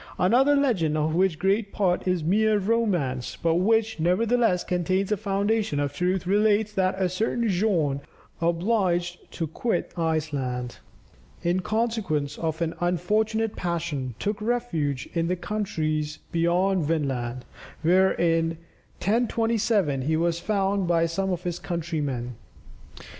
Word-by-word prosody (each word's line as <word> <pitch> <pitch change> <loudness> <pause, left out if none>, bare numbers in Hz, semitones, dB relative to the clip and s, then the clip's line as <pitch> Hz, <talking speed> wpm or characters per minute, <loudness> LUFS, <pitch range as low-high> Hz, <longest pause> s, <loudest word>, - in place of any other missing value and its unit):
Another 255 +10 +4
legend, 195 - +1
of 155 +1 0
which 180 -1 +2
great 200 +4 +1
part 185 -2 0
is 180 -3 +1
mere 215 +5 +3
romance, 185 - 0
but 165 -1 +2
which 220 +2 +2
nevertheless, 210 +3 +2
contains 185 +3 0
a - - +4
foundation 200 -4 0
of 145 -1 -1
truth, 180 +1 0
relates 210 +2 +2
that 190 -1 0
a 190 - +2
certain 220 +6 -1
Bjorn, 175 -8 +1 0.4
who 165 - -1
was 170 - +2
obliged 175 -2 -1
to 165 - -2
quit 220 +9 -2
Iceland 145 -7 -2 0.7
in 175 +2 +1
consequence 210 -9 -1
of 160 0 -1
an 165 0 -2
unfortunate 210 +5 0
passion, 160 -8 -3
took 205 +1 -2
refuge 170 - -1
in 165 -1 0
the 180 - 0
countries 155 -7 -2
beyond 175 +2 +2
Vinland, 130 -6 -2 0.4
where 185 +3 +4
in 165 -1 +1 0.5
1027, 225 - +1
he 155 +4 0
was 170 0 0
found 195 -1 0
by 170 -1 +3
some 190 +4 -1
of 180 -2 -2
his 175 -2 -3
countrymen. 150 -8 -3
180 Hz, 135 wpm, -25 LUFS, 160-210 Hz, 0.7 s, Another